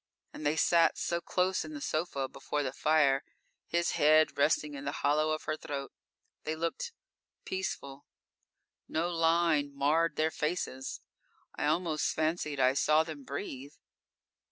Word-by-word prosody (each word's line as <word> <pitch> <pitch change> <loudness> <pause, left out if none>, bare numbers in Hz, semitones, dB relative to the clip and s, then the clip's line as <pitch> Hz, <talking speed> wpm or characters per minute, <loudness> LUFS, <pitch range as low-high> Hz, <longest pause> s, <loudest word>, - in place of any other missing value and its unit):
And - - -8
they 145 +1 +2
sat 165 +1 +4
so 170 0 -1
close 185 +2 0
in 310 - -8
the - - -5
sofa 155 - -2
before 145 +2 -3
the 130 -1 -3
fire, 145 -3 +3 0.4
his 170 0 +1
head 155 +1 +4
resting 150 0 +2
in 140 -1 -7
the 140 - -2
hollow 155 +2 +3
of 155 0 -1
her 155 - -1
throat. 140 -3 -5 0.5
They 155 - -2
looked 170 - -3 0.5
peaceful; 145 -7 -4 0.8
no 170 +2 -1
line 165 -3 +2
marred 150 +3 +2
their 155 +1 +1
faces. 150 -5 -3 0.5
I 145 - -1
almost 160 -1 0
fancied 155 -2 -1
I 130 0 +4
saw 155 +3 +4
them 155 -3 -8
breathe. 140 -1 -6
155 Hz, 145 wpm, -31 LUFS, 145-165 Hz, 0.8 s, sat